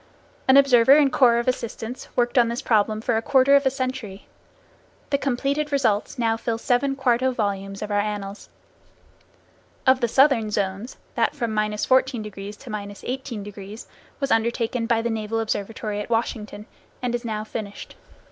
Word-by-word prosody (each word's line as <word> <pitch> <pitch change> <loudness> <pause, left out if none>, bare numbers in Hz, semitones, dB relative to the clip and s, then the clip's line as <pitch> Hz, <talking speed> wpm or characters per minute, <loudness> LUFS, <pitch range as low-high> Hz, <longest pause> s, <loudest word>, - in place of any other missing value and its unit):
An 265 +1 +7
observer 265 -2 +6
and 285 -3 +4
corps 240 -3 +5
of 235 - -1
assistants 240 -1 -3
worked 245 +1 +2
on 235 - +4
this 235 +4 -3
problem 215 -1 +2
for 235 0 0
a - - 0
quarter 270 +2 +4
of 280 -1 +4
a - - +5
century. 255 -7 -5 0.9
The 280 - +2
completed 280 +3 -1
results 230 -5 0
now 225 -2 +1
fill 230 0 -2
seven 255 +4 +1
quarto 260 -1 +2
volumes 195 -4 -3
of 210 - -5
our 205 - +2
annals. 205 -1 -4 1.4
Of 260 0 +4
the 235 - +2
southern 265 -3 +3
zones, 205 +3 -3 0.2
that - - 0
from 235 -6 -2
14° 215 -1 0
to 255 -4 -10
18° 210 -1 -6 0.3
was 275 -1 -2
undertaken 230 +1 0
by 225 -1 +1
the 235 - -1
Naval 220 0 -2
Observatory 215 -1 -3
at 210 - -5
Washington, 215 -2 -2 0.4
and 245 -1 -1
is 240 0 -2
now 215 -2 -3
finished. 215 -2 -7
230 Hz, 155 wpm, -23 LUFS, 210-260 Hz, 1.4 s, An